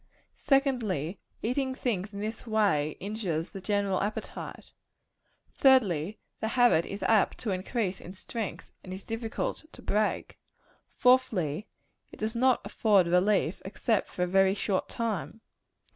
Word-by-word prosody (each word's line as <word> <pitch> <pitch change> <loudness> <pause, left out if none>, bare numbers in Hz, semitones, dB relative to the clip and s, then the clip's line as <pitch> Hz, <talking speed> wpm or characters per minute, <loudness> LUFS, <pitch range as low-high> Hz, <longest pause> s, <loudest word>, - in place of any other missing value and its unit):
Secondly 225 - +1 0.2
eating 260 +3 0
things 210 -6 -2
in 200 -1 -6
this 220 +3 -5
way 195 -9 +2
injures 190 -6 -3
the 195 - -7
general 200 -1 0
appetite. 205 +2 -5 0.8
Thirdly 210 - +3 0.2
the 220 - -1
habit 240 -8 +4
is 200 - -5
apt 220 -3 +3
to 225 - -3
increase 190 0 -2
in 185 - -10
strength, 220 +2 -5
and 185 - -9
is 190 - -7
difficult 225 +4 -3
to - - -13
break. 210 +1 -1 0.5
Fourthly 215 - +2 0.4
it - - -12
does 220 +2 -3
not 255 +1 +3
afford 205 -5 +3
relief, 180 0 +2
except 200 +3 0
for 180 - -2
a - - +1
very 195 +1 +4
short 200 -2 -1
time. 225 -1 -3
210 Hz, 135 wpm, -29 LUFS, 185-230 Hz, 0.8 s, habit